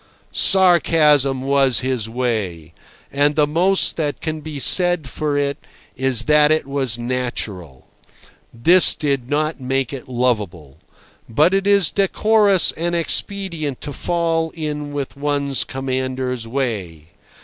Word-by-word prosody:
Sarcasm 155 Hz, -8 st, +3 dB
was 135 Hz, -3 st, +2 dB
"his 125 Hz, -4 st, -2 dB
way," 105 Hz, -10 st, -3 dB, 0.4 s
and 145 Hz, +1 st, +1 dB
the 150 Hz, -, +3 dB
most 180 Hz, +6 st, +1 dB
that 145 Hz, -5 st, -2 dB
can 155 Hz, -1 st, -4 dB
be 150 Hz, -1 st, -7 dB
said 175 Hz, +1 st, +1 dB
for 145 Hz, +2 st, -2 dB
it 140 Hz, 0 st, -1 dB, 0.4 s
is 130 Hz, -3 st, 0 dB
that 150 Hz, 0 st, +4 dB
it 155 Hz, -2 st, +1 dB
was 135 Hz, -4 st, 0 dB
natural. 120 Hz, -, -5 dB, 0.6 s
This 170 Hz, +11 st, +5 dB
did 140 Hz, -4 st, -2 dB
not 155 Hz, 0 st, -1 dB
make 135 Hz, 0 st, -2 dB
it 135 Hz, 0 st, -8 dB
lovable. 105 Hz, -, -2 dB, 0.5 s
But 150 Hz, +10 st, +3 dB
it 195 Hz, 0 st, 0 dB
is 200 Hz, -4 st, +4 dB
decorous 200 Hz, -1 st, +3 dB
and 170 Hz, +1 st, -3 dB
expedient 170 Hz, -, -2 dB
to 145 Hz, -, -6 dB
fall 165 Hz, 0 st, -1 dB
in 150 Hz, -2 st, -5 dB
with 140 Hz, -2 st, -5 dB
one's 140 Hz, -1 st, -1 dB
commander's 130 Hz, -2 st, -4 dB
way. 100 Hz, -, -4 dB
140 Hz, 125 wpm, -19 LUFS, 125-160 Hz, 0.6 s, This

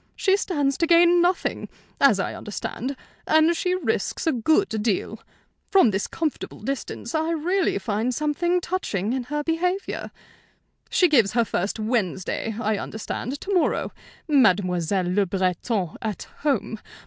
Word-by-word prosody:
She 385 Hz, -1 st, +3 dB
stands 290 Hz, -9 st, -1 dB
to 335 Hz, -, +2 dB
gain 345 Hz, +1 st, +6 dB
nothing, 355 Hz, +1 st, 0 dB, 0.3 s
as 270 Hz, -8 st, +5 dB
I -, -, -2 dB
understand; 245 Hz, +5 st, -5 dB, 0.3 s
and 315 Hz, +2 st, +4 dB
she 360 Hz, +2 st, 0 dB
risks 230 Hz, -, -2 dB
a 325 Hz, -, +3 dB
good 315 Hz, -, +2 dB
deal. 220 Hz, 0 st, -1 dB, 0.5 s
From 375 Hz, -, +5 dB
this 195 Hz, 0 st, -1 dB
comfortable 320 Hz, -3 st, -4 dB
distance, 265 Hz, -3 st, -4 dB
I 320 Hz, 0 st, 0 dB
really 345 Hz, -, +1 dB
find 215 Hz, +4 st, -1 dB
something 325 Hz, +6 st, 0 dB
touching 230 Hz, -, -2 dB
in 260 Hz, -2 st, -2 dB
her 295 Hz, +3 st, -2 dB
behavior. 360 Hz, +5 st, -1 dB, 0.8 s
"She 365 Hz, -, +4 dB
gives 235 Hz, -, +3 dB
her 235 Hz, 0 st, +3 dB
first 200 Hz, +2 st, -2 dB
'Wednesday,' 215 Hz, -1 st, -1 dB
I 215 Hz, -2 st, 0 dB
understand, 245 Hz, +5 st, -5 dB
to 400 Hz, -, -3 dB
morrow. 360 Hz, -, +1 dB, 0.4 s
'Mademoiselle 185 Hz, -, +2 dB
Le 190 Hz, +2 st, +1 dB
Breton 185 Hz, 0 st, -1 dB
at 215 Hz, -4 st, -3 dB, 0.2 s
home!' 275 Hz, -6 st, -1 dB
260 Hz, 140 wpm, -24 LUFS, 210-335 Hz, 0.8 s, gain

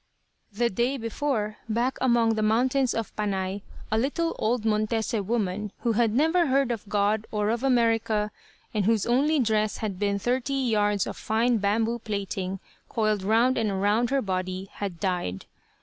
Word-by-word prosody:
The 235 Hz, +3 st, 0 dB
day 240 Hz, +7 st, 0 dB
before, 225 Hz, -2 st, -2 dB
back 240 Hz, +4 st, 0 dB
among 235 Hz, -3 st, +3 dB
the 220 Hz, -, -1 dB
mountains 250 Hz, +4 st, +2 dB
of 225 Hz, -2 st, -4 dB
Panay, 195 Hz, -1 st, -2 dB, 0.3 s
a 220 Hz, -, +2 dB
little 330 Hz, +7 st, -1 dB
old 225 Hz, +1 st, 0 dB
Montese 215 Hz, 0 st, 0 dB
woman, 210 Hz, -1 st, -2 dB
who 235 Hz, -, +1 dB
had 225 Hz, 0 st, +2 dB
never 320 Hz, +7 st, +3 dB
heard 270 Hz, -1 st, +2 dB
of 215 Hz, -3 st, -5 dB
God, 210 Hz, +1 st, +1 dB
or 210 Hz, 0 st, 0 dB
of 235 Hz, 0 st, -1 dB
America, 225 Hz, -4 st, +2 dB, 0.4 s
and 210 Hz, -3 st, 0 dB
whose 220 Hz, -2 st, +2 dB
only 280 Hz, +6 st, +2 dB
dress 215 Hz, -3 st, +1 dB
had 205 Hz, -5 st, -4 dB
been 200 Hz, -1 st, +1 dB
thirty 250 Hz, +6 st, -1 dB
yards 210 Hz, -6 st, +1 dB
of -, -, -6 dB
fine 230 Hz, +2 st, +1 dB
bamboo 225 Hz, +4 st, +1 dB
plaiting 195 Hz, -3 st, -3 dB, 0.3 s
coiled 215 Hz, -3 st, 0 dB
round 230 Hz, +6 st, +3 dB
and 205 Hz, -4 st, 0 dB
round 210 Hz, +4 st, +2 dB
her 275 Hz, 0 st, +1 dB
body, 185 Hz, 0 st, -3 dB
had 195 Hz, -5 st, -5 dB
died. 175 Hz, -, -2 dB
220 Hz, 165 wpm, -26 LUFS, 205-240 Hz, 0.4 s, among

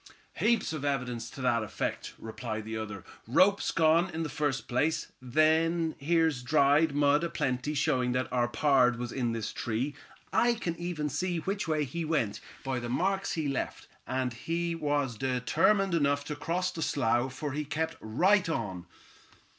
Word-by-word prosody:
"Heaps 230 Hz, -7 st, +2 dB
of 155 Hz, -3 st, -4 dB
evidence 125 Hz, -5 st, -2 dB
to 135 Hz, -, -9 dB
that 120 Hz, -2 st, +2 dB
effect," 110 Hz, -, -4 dB
replied 110 Hz, -1 st, -5 dB
the 110 Hz, 0 st, -5 dB
other. 105 Hz, -3 st, -5 dB, 0.2 s
"Rope's 190 Hz, -, +4 dB
gone, 165 Hz, +3 st, +3 dB
in 165 Hz, -1 st, -3 dB
the 155 Hz, -, -3 dB
first 145 Hz, -2 st, -1 dB
place. 145 Hz, +6 st, 0 dB
Then 160 Hz, +5 st, +2 dB
here's 160 Hz, -2 st, +2 dB
dried 145 Hz, +2 st, +3 dB
mud 145 Hz, +2 st, +3 dB
a 170 Hz, -, -1 dB
plenty, 135 Hz, -1 st, -1 dB
showing 130 Hz, -4 st, +1 dB
that 125 Hz, -1 st, 0 dB
our 120 Hz, -1 st, +2 dB
pard 125 Hz, -2 st, +3 dB
was 120 Hz, 0 st, -4 dB
in 120 Hz, -3 st, -1 dB
this 115 Hz, -2 st, -3 dB
tree. 120 Hz, +6 st, -2 dB, 0.4 s
I 240 Hz, 0 st, +4 dB
can 175 Hz, -7 st, -3 dB
even 170 Hz, -3 st, -3 dB
see 175 Hz, +5 st, -1 dB
which 195 Hz, +4 st, -2 dB
way 155 Hz, -2 st, +1 dB
he 165 Hz, +5 st, -4 dB
went, 150 Hz, -10 st, 0 dB, 0.2 s
by 135 Hz, -2 st, -1 dB
the 120 Hz, 0 st, -5 dB
marks 190 Hz, +9 st, 0 dB
he 155 Hz, -3 st, -1 dB
left; 135 Hz, -2 st, -3 dB, 0.2 s
and 130 Hz, -1 st, -1 dB
he 170 Hz, +7 st, -2 dB
was 145 Hz, -7 st, -1 dB
determined 160 Hz, -, +2 dB
enough 145 Hz, -3 st, +2 dB
to 150 Hz, -, -4 dB
cross 180 Hz, +5 st, -1 dB
the 165 Hz, -, -6 dB
slough, 130 Hz, -3 st, +1 dB
for 145 Hz, +1 st, -3 dB
he 150 Hz, +3 st, -2 dB
kept 160 Hz, +3 st, -2 dB
right 180 Hz, -, +3 dB
on." 95 Hz, -, -3 dB
145 Hz, 170 wpm, -30 LUFS, 125-165 Hz, 0.4 s, Rope's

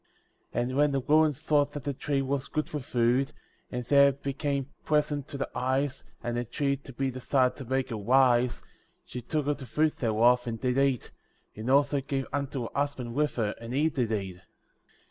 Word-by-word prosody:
*' -, -, -43 dB
12. 120 Hz, -, +1 dB
And 130 Hz, -, -3 dB
when 145 Hz, 0 st, +4 dB
the 135 Hz, -, +2 dB
woman 155 Hz, +3 st, +4 dB
saw 150 Hz, +1 st, +2 dB
that 145 Hz, -1 st, -7 dB
the 140 Hz, -, -2 dB
tree 135 Hz, +1 st, -1 dB
was 135 Hz, 0 st, -2 dB
good 155 Hz, -1 st, -2 dB
for 150 Hz, -, -4 dB
food, 125 Hz, +2 st, +1 dB, 0.4 s
and 125 Hz, -1 st, -4 dB
that 140 Hz, +1 st, +6 dB
it 140 Hz, 0 st, -2 dB
became 140 Hz, 0 st, -2 dB
pleasant 150 Hz, -2 st, 0 dB
to 140 Hz, -, -6 dB
the 135 Hz, -, -2 dB
eyes, 130 Hz, +2 st, -1 dB, 0.2 s
and 120 Hz, 0 st, -1 dB
a -, -, -1 dB
tree 140 Hz, +4 st, -1 dB
to 135 Hz, 0 st, -12 dB
be 135 Hz, +1 st, -1 dB
desired 130 Hz, 0 st, +1 dB
to 135 Hz, -, -7 dB
make 130 Hz, +1 st, -1 dB
her 115 Hz, -, -2 dB
wise, 125 Hz, +2 st, +3 dB, 0.4 s
she 125 Hz, -, -6 dB
took 150 Hz, +4 st, -2 dB
of 145 Hz, 0 st, 0 dB
the 135 Hz, -3 st, -9 dB
fruit 155 Hz, +6 st, +1 dB
thereof, 120 Hz, +2 st, +3 dB
and 115 Hz, -1 st, -3 dB
did 125 Hz, +2 st, +1 dB
eat, 135 Hz, -3 st, +1 dB, 0.4 s
and 110 Hz, +4 st, -4 dB
also 140 Hz, +1 st, +3 dB
gave 135 Hz, 0 st, -2 dB
unto 140 Hz, -2 st, -2 dB
her 115 Hz, -, -4 dB
husband 140 Hz, -4 st, -2 dB
with 150 Hz, +1 st, 0 dB
her, 105 Hz, -4 st, 0 dB
and 115 Hz, +2 st, -5 dB
he 155 Hz, +3 st, +3 dB
did 125 Hz, -7 st, -1 dB
eat. 95 Hz, -4 st, -3 dB
135 Hz, 210 wpm, -28 LUFS, 125-145 Hz, 0.4 s, that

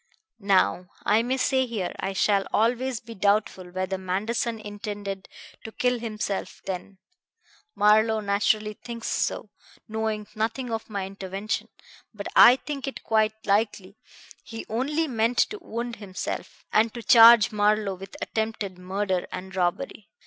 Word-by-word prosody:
"Now 190 Hz, -2 st, +2 dB, 0.2 s
I 215 Hz, +2 st, +4 dB
may 250 Hz, +3 st, -1 dB
say 260 Hz, 0 st, +2 dB
here 210 Hz, -7 st, -3 dB
I 195 Hz, -, -2 dB
shall 195 Hz, 0 st, +2 dB
always 245 Hz, +2 st, +1 dB
be 230 Hz, +1 st, -11 dB
doubtful 200 Hz, -2 st, 0 dB
whether 185 Hz, +1 st, -3 dB
Manderson 215 Hz, +5 st, -2 dB
intended 205 Hz, -2 st, -6 dB, 0.3 s
to 220 Hz, -, -7 dB
kill 250 Hz, +1 st, 0 dB
himself 215 Hz, -3 st, -4 dB
then. 190 Hz, +1 st, -5 dB, 0.8 s
Marlowe 220 Hz, +1 st, +4 dB
naturally 210 Hz, +1 st, +1 dB
thinks 230 Hz, +1 st, -7 dB
so, 210 Hz, -, -1 dB, 0.4 s
knowing 220 Hz, -1 st, -2 dB
nothing 230 Hz, +3 st, -2 dB
of 225 Hz, 0 st, -4 dB
my 200 Hz, -3 st, -3 dB
intervention. 195 Hz, +2 st, -4 dB, 0.5 s
But 200 Hz, -1 st, -6 dB
I 245 Hz, -, +9 dB
think 275 Hz, 0 st, -6 dB
it 270 Hz, -, -6 dB
quite 220 Hz, 0 st, +1 dB
likely 200 Hz, -1 st, 0 dB, 0.5 s
he 225 Hz, -1 st, -8 dB
only 290 Hz, +8 st, 0 dB
meant 235 Hz, -1 st, 0 dB
to 420 Hz, -, -6 dB
wound 235 Hz, +1 st, -5 dB
himself, 185 Hz, -2 st, -6 dB
and 220 Hz, +1 st, +4 dB
to 235 Hz, -, -6 dB
charge 230 Hz, -1 st, +8 dB
Marlowe 210 Hz, -1 st, +2 dB
with 190 Hz, +1 st, -10 dB
attempted 220 Hz, -4 st, -3 dB
murder 185 Hz, 0 st, -2 dB
and 190 Hz, +1 st, -7 dB
robbery. 185 Hz, +3 st, -2 dB
215 Hz, 140 wpm, -26 LUFS, 195-230 Hz, 0.8 s, I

